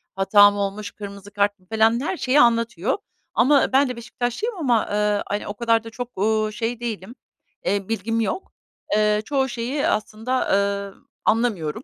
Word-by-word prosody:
hata 205 +1 +6
mı 205 - -5
olmuş? 200 +1 -3
Kırmızı 200 -1 -10
kart 205 0 0
mı 185 - -27
falan 220 +2 +2
her 360 +3 -2
şeyi 270 +2 +2
anlatıyor. 230 - +2 0.4
Ama 280 +1 +4
ben 270 0 +4
de 250 - -4
Beşiktaşlıyım 245 - -3
ama, 245 -9 +2
ııı, 210 0 +1
hani 205 +1 -3
o 205 - -4
kadar 230 0 +1
da 225 - -8
çok, 245 -1 -7
uuu, 215 +1 +1
şey 230 +2 -3
değilim, 230 -1 -5 0.5
eee, 200 0 -1
bilgim 225 0 -1
yok. 225 - -3 0.4
Eee, 210 0 +3
çoğu 265 +2 0
şeyi 250 +5 -2
aslında, 220 +4 -1
ııı, 200 0 0 0.3
anlamıyorum 220 -4 0
220 Hz, 165 wpm, -23 LUFS, 205-240 Hz, 0.5 s, hata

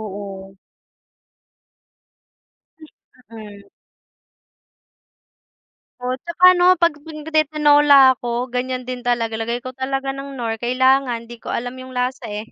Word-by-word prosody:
oo. 195 -2 -8 2.8
M, 230 - -11
mm. 205 -2 -11 2.4
O 250 - -6
at - - -28
saka 340 +1 +3
'no 355 +1 +5
kapag 335 -3 +2
nagti-Tinola 295 -3 +4
ako 240 +1 -3
ganiyan 250 0 -4
din 250 -1 -6
talaga 230 -2 -1
lagay 235 +2 -3
ko 255 - -8
talaga 270 +1 -3
ng 275 0 -8
Knorr 230 -4 -4
kailangan 250 0 +1
di 240 - -10
ko 230 - -8
alam 245 +2 -4
yung 255 0 -10
lasa 250 +1 -3
eh, 210 0 -6
255 Hz, 120 wpm, -20 LUFS, 230-275 Hz, 2.8 s, no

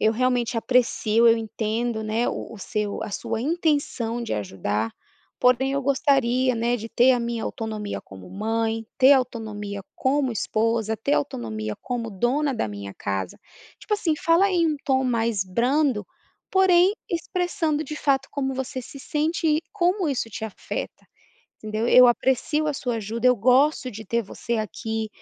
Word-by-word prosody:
"Eu 220 - +3
realmente 245 -1 +1
aprecio 230 -1 +3
eu 230 - +6
entendo, 225 +1 -2
né, 220 +2 0
o - - -5
o - - -11
seu 210 +1 -3
a - - -5
sua 220 - -3
intenção 285 -7 0
de 235 - -4
ajudar, 105 +2 -2 0.5
porém 255 +2 +3
eu 280 0 -1
gostaria, 260 -2 +2
né, 235 +1 +1
de 225 -1 -7
ter 240 +3 +4
a 245 - +1
minha 235 -1 -3
autonomia 215 -2 -4
como 95 -1 -13
mãe, 225 +2 -1
ter 265 +1 +8
autonomia 215 -6 -2
como 270 0 +1
esposa, 220 0 0
ter 280 +7 0
autonomia 110 - -3
como 235 -2 -3
dona 260 +9 0
da 225 - -1
minha 100 -1 -7
casa". 95 -2 -4 0.4
Tipo 425 - -1
assim, 345 -6 0
fala 345 +4 +3
em 345 -3 +2
um - - -6
tom 265 -1 +2
mais 230 -5 0
brando, 245 +4 +1 0.5
porém 375 0 +5 0.2
expressando, 335 -3 -1
de 305 - -6
fato, 270 -2 +1
como 270 -2 -1
você 260 0 -4
se 275 - -11
sente 310 +4 -1
e 310 +1 +2
como 360 0 +1
isso 260 -5 -1
te 220 +1 -5
afeta, 220 - -6 0.5
entendeu 215 +2 -2
"Eu 250 0 +8
aprecio 265 +5 +1
a 295 - -1
sua 245 -3 -2
ajuda, 225 +3 -2
eu 250 - +5
gosto 255 +4 +3
de 220 -1 -9
ter 235 +4 0
você 235 +3 -4
aqui, 220 +1 -3
240 Hz, 165 wpm, -24 LUFS, 220-275 Hz, 0.5 s, ter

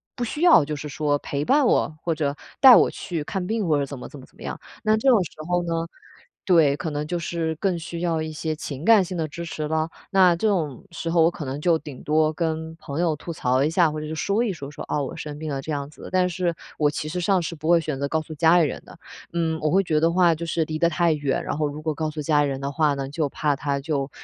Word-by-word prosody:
不 245 - -3
需 270 +6 -4
要 345 - +7
就 150 - -3
是 150 +1 -6
说 145 +1 0
陪 140 +1 -3
伴 280 - +4
我， 155 - +1
或 170 - 0
者 145 -2 -1 0.3
带 260 -3 +11
我 - - +5
去 170 -6 -4
看 185 +4 -3
病 220 -3 -1
或 150 -2 +3
者 140 - 0
怎 140 - -7
么 - - -8
怎 145 - -11
么 130 - -12
怎 - - -28
么 - - -13
样， - - -5 0.2
那 215 0 +3
这 265 +5 +2
种 225 -6 +5
时 - - -9 0.2
候 175 0 +1
呢， 170 -1 -2 0.7
对， 160 -7 +4
可 165 - -3
能 150 0 -3
就 175 +2 -2
是 165 -1 -2
更 180 +1 -1
需 170 +1 -6
要 165 -2 0
一 155 0 -4
些 155 0 -3
情 145 0 -6
感 220 -4 +6
性 180 0 -5
的 160 -2 -1
支 170 +4 -7
持 155 -2 -4
了。 160 +1 0 0.2
那 185 -2 +6
这 220 - +1
种 160 - -1
时 165 0 -4
候 165 -1 +3
我 165 - +6
可 155 - -7
能 135 +2 -4
就 165 +1 +3
顶 145 -4 -10
多 155 +1 +2
跟 160 0 -3
朋 155 0 -4
友 170 -2 +2
吐 170 - -6
槽 130 -3 +1
一 150 - +2
下， 165 -1 +3
或 155 - -4
者 155 - -5
是 160 - -4
说 200 +7 0
一 215 - -1
说， 145 -4 -8
说： - - -8
“哦， 145 - -1
我 - - -7
生 150 -1 -6
病 155 -1 -4
了。” 135 -1 -2
这 155 - -6
样 140 -1 -3
子。 150 - -12
但 185 -1 +3
是， 175 -1 -1 0.2
我 150 -1 +3
其 150 +1 -4
实 180 - -3
上 190 0 +2
是 170 - -4
不 155 +2 -4
会 170 -1 +5
选 145 -3 -4
择 140 - -1
告 160 +2 0
诉 155 - -9
家 165 +3 +5
里 160 - +4
人 - - -6
的， - - -14 0.4
嗯， 160 -2 0
我 155 - +1
会 195 +2 +4
觉 165 -4 -1
得 150 - +3
的 165 +1 +3
话 175 -2 +4
就 170 +2 -5
是 165 0 0
离 155 0 -4
得 170 - +4
太 170 -1 +2
远， 145 -3 -1
然 - - -3
后 150 -1 +1
如 145 +1 -6
果 155 -1 -1
告 155 +1 -2
诉 155 0 -5
家 150 0 +2
里 - - +1
人 135 0 -4
的 140 +1 -3
话 150 -1 +2
呢， 135 -1 -4
就 150 0 -1
怕 145 0 0
他 140 0 -1
就， 140 -2 -2
160 Hz, 315 characters per minute, -24 LUFS, 150-175 Hz, 0.7 s, 带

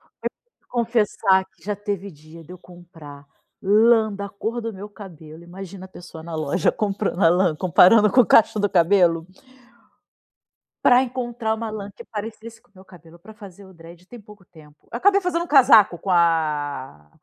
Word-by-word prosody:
te - - -37 0.5
confessar 215 -5 0
que - - -32
já 210 - -3
teve 200 -1 -6
dia 155 +1 -16
de 170 - -13
eu 180 - -12
comprar 165 -6 -15 0.4
lã 220 +2 +3
da 200 0 -6
cor 220 +4 -5
do 230 - -5
meu 200 +1 -10
cabelo. 170 -6 -13
Imagina 190 +2 -11
a - - -12
pessoa 170 -3 -12
na 170 -1 -8
loja 155 +2 -1
comprando 200 -2 -3
a 165 - +6
lã, 175 -2 +1
comparando 195 +5 +4
com 250 - +4
o - - -4
cacho 220 -1 +4
do 205 -1 0
cabelo 170 -2 +2 1.6
para 245 0 +5
encontrar 240 -3 -3
uma 225 0 -6
lã 205 -2 -7
que 235 - -13
parecesse 225 +1 -9
com 245 - -34
o - - -40
meu 190 0 -17
cabelo 170 -2 -17
para 175 +6 -15
fazer 200 -2 -14
o 190 - -16
dread 170 +1 -16
tem 240 0 -13
pouco 210 -1 -18
tempo. 155 -4 -21
Eu - - -4
acabei 400 +5 +3
fazendo 350 -2 -2
um - - -10
casaco 235 - +5
com 190 - -6
a 150 - -1
195 Hz, 185 wpm, -21 LUFS, 170-220 Hz, 1.6 s, a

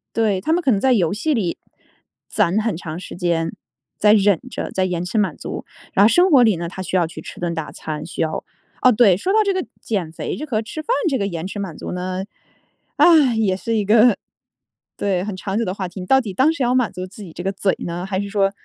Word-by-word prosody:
对， 210 -5 +1
他 315 - -1
们 350 - +2
可 270 - +2
能 200 - +2
在 260 +3 +3
游 180 -7 +2
戏 295 +9 0
里， 195 -8 -1 0.7
攒 185 +6 +1
很 220 -3 -1
长 165 0 -6
时 - - -9
间， 170 -2 0 0.5
在 210 0 +5
忍 200 -4 +4
着 - - -5
在 185 -1 0
延 180 -2 -2
迟 210 +5 -3
满 190 -7 +1
足。 - - -6 0.3
然 195 - +5
后 210 - +8
生 350 - +4
活 260 -4 +7
里 220 -5 +4
呢， 170 0 -4
他 190 +2 -7
需 185 - -3
要 175 -2 +3
去 160 -1 -8
吃 - - -10
顿 175 -1 -2
大 160 -2 -5
餐， 155 0 -6
需 170 - -5
要 160 -1 -1 0.4
哦， 255 - +6
对， 215 -5 +5
说 375 - -1
到 440 - +4
这 400 - +1
个 370 -1 -2 0.2
减 185 -8 -2
肥 - - -4
这 305 - -5
和 225 -6 -1
吃 310 +8 -6
饭 - - -21 0.2
这 270 -4 +1
个 200 - -1
延 170 -2 -4
迟 205 +2 -5
满 180 -6 -5
足 - - -6
呢， 185 +1 -3 0.7
唉， 300 -9 +6
也 195 -4 +2
是 230 +4 -2
一 210 -2 0
个， 225 +1 +5 0.8
对， 190 -3 0
很 205 -2 -4
长 195 +2 -3
久 230 - +1
的 185 - -2
话 190 -2 -4
题。 180 +2 -9
你 180 - -6
到 265 +7 +5
底 205 -5 -6
当 265 - +4
时 285 -5 -2
要 245 +1 +2
满 250 -4 +2
足 180 0 -6
自 200 +3 -13
己 170 - -10
这 175 - -7
个 195 - 0
嘴 195 -1 0
呢， 175 +1 -4
还 190 -1 -2
是 200 - -3
说 195 -1 +2
195 Hz, 275 characters per minute, -21 LUFS, 180-230 Hz, 0.8 s, 后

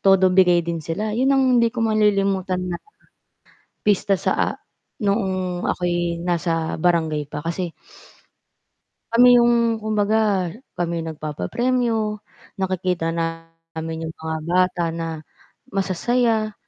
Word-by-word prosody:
todo 190 -1 +5
bigay 180 -2 +4
din 170 -1 -3
sila. 190 +8 -3
Yun 255 +5 +1
ang 270 -1 +4 0.2
hindi 235 - +4
ko 230 0 -2
malilimutan 195 -4 +1
na. 170 - -5 1.1
Pista 205 -1 +3
sa 190 - 0
a - - +2 0.5
noong 190 -3 -1
ako'y 175 -1 -1
nasa 170 -2 -1
barangay 160 -3 +1
pa 150 +1 -6
kasi 170 +1 -3 1.4
kami 245 +1 +6
yung 235 -1 +2
kumbaga 210 -3 +1 0.3
kami 170 -1 -1
yung 165 - -5
nagpapapremyo, 215 - -1 0.4
nakikita 185 -3 -1
namin 165 -1 -5
yung 160 - -6
mga 160 0 -4
bata 180 0 +2
na 165 0 -3 0.7
masasaya. 215 +3 +1
185 Hz, 115 wpm, -22 LUFS, 165-215 Hz, 1.4 s, kami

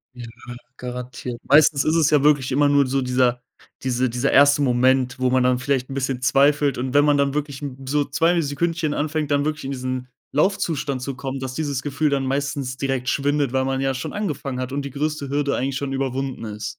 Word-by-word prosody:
Ja, 120 -1 -8 0.5
garantiert. 125 -1 -6
Meistens 145 0 +5
ist 155 +2 +1
es 160 -2 +3
ja 145 -2 +4
wirklich 140 -3 +3
immer 145 +2 +3
nur 140 -1 +4
so 135 +1 0
dieser 125 -1 +1 0.4
diese 130 -1 0
dieser 125 +3 0
1. 145 +1 +5
Moment, 130 0 +2
wo 130 0 +2
man 130 -1 +3
dann 125 0 +3
vielleicht 130 0 -1
'n - - -6
bisschen 130 -2 -2
zweifelt 140 +2 +3
und 130 +1 -3
wenn 145 0 +5
man 145 -1 +3
dann 140 0 +1
wirklich, 145 -2 -3
hm, 135 -3 -6
so 145 +1 +1
2 165 +5 +2
Sekündchen 160 +1 -1
anfängt, 150 0 -2
dann 145 0 +2
wirklich 155 -1 -2
in 135 - -3
diesen 130 -1 -4 0.2
Laufzustand 150 -5 0
zu 135 0 -4
kommen, 135 0 -5
dass 130 -1 -5
dieses 145 -4 -2
Gefühl 145 +2 0
dann 135 -1 0
meistens 135 -1 -2
direkt 135 -2 -2
schwindet, 140 -2 0
weil 130 0 +1
man 135 0 -1
ja 135 0 0
schon 130 - -5
angefangen 145 -10 -3
hat 130 +1 -4
und 140 0 -2
die 140 - -5
größte 145 0 -3
Hürde 140 0 0
eigentlich 135 +1 -2
schon 135 -1 -3
überwunden 135 -2 -3
ist. 105 0 -5
135 Hz, 215 wpm, -22 LUFS, 130-145 Hz, 0.5 s, Meistens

